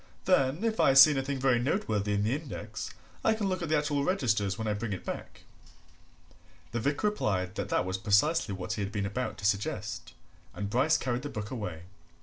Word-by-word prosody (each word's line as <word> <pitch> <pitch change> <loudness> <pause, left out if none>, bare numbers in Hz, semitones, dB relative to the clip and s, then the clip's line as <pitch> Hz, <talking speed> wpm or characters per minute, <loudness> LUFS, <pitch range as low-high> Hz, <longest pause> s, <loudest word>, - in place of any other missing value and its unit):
then, 150 -1 +2
if 225 -1 0
I 135 - +5
see 135 +3 +10
anything 135 0 -1
very 130 -2 +3
noteworthy 110 - 0
in 100 - +1
the 110 +4 +1
index, 115 -8 -5 0.3
I 220 - +3
can 215 -2 -1
look 185 -1 -1
at 170 - -3
the 155 - +3
actual 145 -1 0
registers 110 - +1
when 110 - -3
I 105 - +1
bring 105 0 -3
it 95 - -7
back." - - -7 1.3
The 120 - -1
vicar 145 - +1
replied 95 - -1
that - - -4
that - - +1
was 95 +1 -2
precisely 105 - +2
what 95 +2 -4
he 110 - -3
had 100 0 -3
been 100 -2 -2
about 110 +3 -3
to 100 - -6
suggest, 100 0 -2 0.4
and 100 0 -4
Bryce 130 +7 +3
carried 125 -1 -2
the 145 - -5
book 105 -3 -6
away. 90 -10 -5
120 Hz, 205 wpm, -29 LUFS, 105-145 Hz, 1.3 s, see